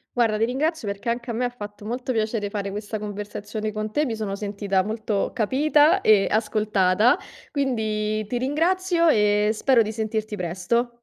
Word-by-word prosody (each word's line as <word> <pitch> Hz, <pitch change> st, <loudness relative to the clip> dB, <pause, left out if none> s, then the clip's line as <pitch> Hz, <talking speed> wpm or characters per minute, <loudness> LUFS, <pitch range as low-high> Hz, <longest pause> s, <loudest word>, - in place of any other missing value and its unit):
Guarda 225 Hz, -3 st, +2 dB
ti 225 Hz, -, +2 dB
ringrazio 280 Hz, 0 st, -1 dB
perché 200 Hz, +3 st, -3 dB
anche 240 Hz, +1 st, -2 dB
a -, -, -3 dB
me 250 Hz, +2 st, 0 dB
ha -, -, 0 dB
fatto 205 Hz, -3 st, -9 dB
molto 250 Hz, +3 st, -3 dB
piacere 215 Hz, -2 st, -1 dB
fare 200 Hz, -1 st, -3 dB
questa 205 Hz, +2 st, -5 dB
conversazione 210 Hz, +1 st, -5 dB
con 215 Hz, 0 st, -4 dB
te, 300 Hz, +7 st, +1 dB
mi 230 Hz, -3 st, -2 dB
sono 205 Hz, -3 st, -3 dB
sentita 200 Hz, -2 st, -1 dB
molto 215 Hz, -1 st, -2 dB
capita 300 Hz, -, +3 dB
e 205 Hz, -2 st, +5 dB
ascoltata, 210 Hz, -, +2 dB, 0.3 s
quindi 215 Hz, -6 st, -1 dB
ti 245 Hz, -, -2 dB
ringrazio 335 Hz, +6 st, +1 dB
e 210 Hz, -5 st, +3 dB
spero 245 Hz, +1 st, +3 dB
di 215 Hz, -, -1 dB
sentirti 220 Hz, -1 st, -3 dB
presto. 185 Hz, +7 st, -1 dB
215 Hz, 170 wpm, -24 LUFS, 210-245 Hz, 0.3 s, e